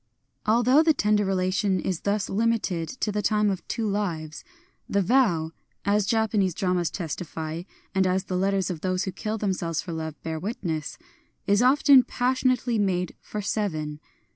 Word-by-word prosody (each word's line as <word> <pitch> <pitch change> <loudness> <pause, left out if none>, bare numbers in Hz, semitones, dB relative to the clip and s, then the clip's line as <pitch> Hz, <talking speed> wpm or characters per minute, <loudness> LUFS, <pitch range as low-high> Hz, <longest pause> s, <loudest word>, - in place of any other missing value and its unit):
Although 240 +6 +5
the 320 -1 +3
tender 210 -3 +2
relation 190 0 +1
is 180 -2 -2
thus 200 0 0
limited 210 -6 0
to 210 - +1
the 210 +1 -1
time 210 0 +2
of 190 -2 -3
two 225 -2 -2
lives, 170 -7 -3 0.5
the 200 0 +2
vow 175 -9 +2 0.2
— - - -43
(as 205 0 +2
Japa 220 -1 +1
nese 185 -4 0
dramas 180 -3 0
testify, 160 -2 -5 0.3
and 190 -1 +2
as 185 +1 +1
the 185 - -4
letters 195 0 +1
of 165 -3 -6
those 185 0 0
who 190 - -3
kill 215 +4 -3
themselves 180 -6 -1
for 170 - -4
love 160 -1 -5
bear 160 -1 -3
witness) 175 - -4 0.2
— - - -42
is 205 +2 +3
often 270 +1 +6
passionately 250 -2 0
made 180 -3 0
for 210 -1 -5
seven. 155 -8 -2
195 Hz, 170 wpm, -26 LUFS, 175-215 Hz, 0.5 s, often